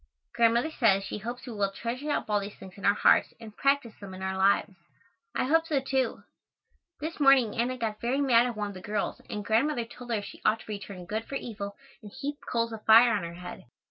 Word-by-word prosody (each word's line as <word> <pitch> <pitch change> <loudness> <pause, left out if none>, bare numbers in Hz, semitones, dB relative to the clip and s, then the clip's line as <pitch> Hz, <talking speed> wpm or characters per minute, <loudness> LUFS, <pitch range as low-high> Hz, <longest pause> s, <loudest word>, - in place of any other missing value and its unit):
Grandmother 235 +5 +3
says 200 -9 +3
she 205 - -5
hopes 240 +4 -6
we 245 - -7
will 200 -2 0
treasure 240 +8 -4
up - - -1
all 210 -1 +2
these 200 +1 -7
things 190 - -12
in 200 - -7
our 200 - +5
hearts - - +4
and 220 -2 -11
practice 275 -5 +1
them 195 -2 -8
in 190 - -8
our 190 0 -2
lives. 195 +1 +2 0.6
I - - +1
hope 325 +5 +2
so, 295 -4 +1
too. 265 -2 -1 0.8
This 315 +2 -5
morning 270 -6 +5
Anna 245 +2 0
got 220 -3 -3
very 250 +4 0
mad 250 -4 +4
at 240 -3 -5
one 205 -1 -2
of - - -8
the 185 - -9
girls 205 +1 -3
and 210 -1 -5
Grandmother 235 +3 +1
told 245 +1 -12
her 215 -3 0
she - - -11
ought 220 - +2
to - - -14
return 200 -3 -7
good 220 +5 -3
for 275 - -6
evil 200 -6 -5 0.3
and 210 -2 -11
heap 290 +6 -5
coals 230 -1 0
of 220 - -8
fire 230 +2 +7
on 205 - 0
her 170 0 -6
head. 180 +1 -9
225 Hz, 235 wpm, -28 LUFS, 205-255 Hz, 0.8 s, fire